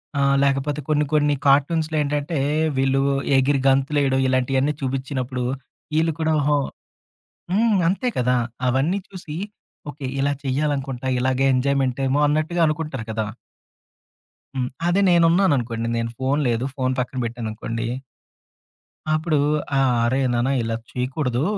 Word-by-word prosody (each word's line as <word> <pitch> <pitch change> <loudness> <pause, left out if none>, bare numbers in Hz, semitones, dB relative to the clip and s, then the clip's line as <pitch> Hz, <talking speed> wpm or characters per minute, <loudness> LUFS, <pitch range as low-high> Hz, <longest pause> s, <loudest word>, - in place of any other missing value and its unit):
ఆ! 140 - +1 0.2
లేకపోతే 140 +1 0
కొన్ని 150 -1 +2
కొన్ని 150 -1 +3
కార్టూన్స్‌లో 155 +3 +3
ఏంటంటే, 145 +2 -1 0.4
వీళ్ళు 135 0 +2 0.4
ఎగిరి 135 +1 +2
గంతులు 135 +2 +2
వేయడం, 135 -1 +2
ఇలాంటివన్నీ 130 +3 +1
చూపించినప్పుడు. 130 -1 -3 0.5
వీళ్ళు 165 +1 +2
కూడా 160 0 +1
ఓహో 145 0 +2 1.0
హ్మ్. 215 0 +3
అంతే 200 +8 0
కదా! 125 0 +2 0.3
అవన్నీ 140 +10 +1
చూసి 175 -5 -8 0.5
ఓకే, 140 -2 -7
ఇలా 140 +1 +2
చేయాలనుకుంటా. 135 -2 -1
ఇలాగే 130 +1 +1
ఎంజాయ్మెంట్ 135 0 +1
ఏమో 140 +3 +2
అన్నట్టుగా 155 +4 0
అనుకుంటారు 150 -5 -3
కదా! 110 -1 -2 1.3
హ్మ్. 125 -1 -1 0.2
అదే 185 +3 +3
నేనున్నాను 170 +1 +4
అనుకోండి. 115 -1 -3
నేను 115 0 -1
ఫోన్ 135 +3 +1
లేదు, 115 +1 0
ఫోన్ 130 0 0
పక్కన 125 +1 -5
పెట్టాను 115 -1 -4
అనుకోండి. 115 +1 -4 1.3
అప్పుడు 155 0 +1 0.4
ఆహ్, 135 -2 +3
"అరేయ్! 130 +3 +1
నాన్న 120 +2 +1
ఇలా 115 0 -2 0.2
చేయకూడదు. 125 0 -1
135 Hz, 130 wpm, -22 LUFS, 130-150 Hz, 1.3 s, నేనున్నాను